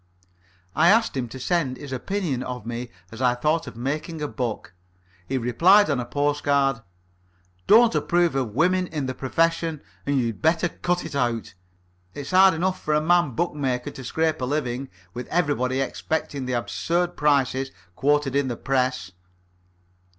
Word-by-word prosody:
I 170 - +5
asked 225 -2 +3
him 130 -2 -2
to 130 - -8
send 140 -3 0
his 140 +1 -9
opinion 145 0 -2
of 125 -3 -6
me 120 +1 -5 0.2
as 115 +2 -8
I 125 -1 +3
thought 155 +6 0
of - - -8
making 150 +6 -3
a 150 - -2
book. 120 -9 -4 0.5
He 135 - -1
replied 165 - +4
on 140 - 0
a 120 - -4
postcard: 145 -3 +1 0.9
"Don't 230 0 +6
approve 170 +2 +2
of 125 -6 -2
women 180 +4 +2
in 150 -5 -3
the 130 - -3
profession, 165 +3 0 0.3
and 140 -1 +2
you'd 115 -3 -2
better 165 +2 +2
cut 175 +2 -2
it 160 - -7
out. 120 -6 -1 0.6
It's 145 +2 -6
hard 190 -1 +6
enough 185 +3 -1
for 150 - 0
a - - +4
man 160 -4 +2
bookmaker 135 -5 -1
to 135 - -10
scrape 160 +4 -1
a - - 0
living, 135 -2 -2 0.2
with 125 0 -6
everybody 140 -6 0
expecting 135 0 -3
the 130 - -2
absurd 170 +8 -1
prices 135 -2 +1 0.3
quoted 145 -1 +1
in 140 -1 +2
the 120 -2 -3
press." 130 -8 -1
140 Hz, 165 wpm, -24 LUFS, 125-165 Hz, 0.9 s, Don't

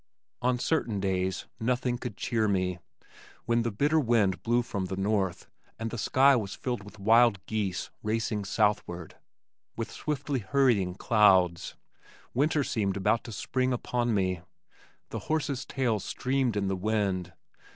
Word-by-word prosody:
On 125 0 +2
certain 120 -6 0
days 95 -1 -1
nothing 125 +1 0
could 120 -6 -6
cheer 110 -3 0
me. 90 -3 0 0.7
When 120 -1 +2
the 115 - 0
bitter 145 +9 +2
wind 110 -8 +2
blew 120 +1 +2
from 100 -5 -3
the 95 - -4
north, 95 -2 0 0.3
and 115 0 -4
the 120 - -4
sky 135 +5 +5
was 105 -5 -2
filled 125 -4 -3
with 105 +1 -13
wild 110 -1 +4
geese 100 -4 -2
racing 110 -1 -1
southward, 95 -4 -1 0.6
with 115 - -4
swiftly 145 -2 -2
hurrying 105 -5 +2
clouds, 95 -6 +3 0.6
winter 145 +3 +2
seemed 100 -6 -1
about 105 +4 +1
to 115 - -7
spring 130 +4 -1
upon 120 -1 -1
me. 95 -3 0 0.7
The - - -4
horses' 145 -4 -1
tails 115 -7 0
streamed 130 -2 0
in 100 -1 0
the 95 - 0
wind. 95 -3 -1
110 Hz, 145 wpm, -28 LUFS, 95-125 Hz, 0.7 s, sky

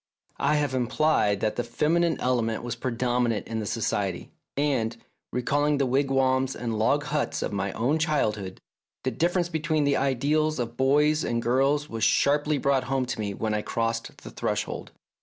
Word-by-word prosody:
I 145 +2 +2
have 145 -3 0
implied 125 -5 +2
that 110 - -1
the 120 - 0
feminine 160 +7 +1
element 120 -3 0
was 120 -1 -3
predominant 120 -2 0
in 115 -1 -3
the 105 - -3
Society, 100 -4 -2 0.3
and, 125 -6 0 0.3
recalling 145 +4 +1
the 140 - +2
wigwams 135 0 +1
and 115 -3 -3
log 140 +7 +2
huts 150 0 -1
of - - -3
my 100 0 -1
own 135 +8 +1
childhood, 105 - -1 0.4
the 130 - 0
differ 170 +9 0
ence 175 -1 0
between 160 -2 0
the 140 -1 +2
ideals 145 +4 +1
of 120 -2 -3
boys 150 +4 +3
and 115 - 0
girls 135 +5 +1
was 115 -4 -4
sharply 145 +1 +3
brought 135 -2 +1
home 135 -1 0
to 125 - -4
me 100 -2 -3
when 110 +1 -2
I 105 - 0
crossed 115 +1 -3
the - - -9
threshold. - - -3
130 Hz, 175 wpm, -26 LUFS, 115-145 Hz, 0.4 s, boys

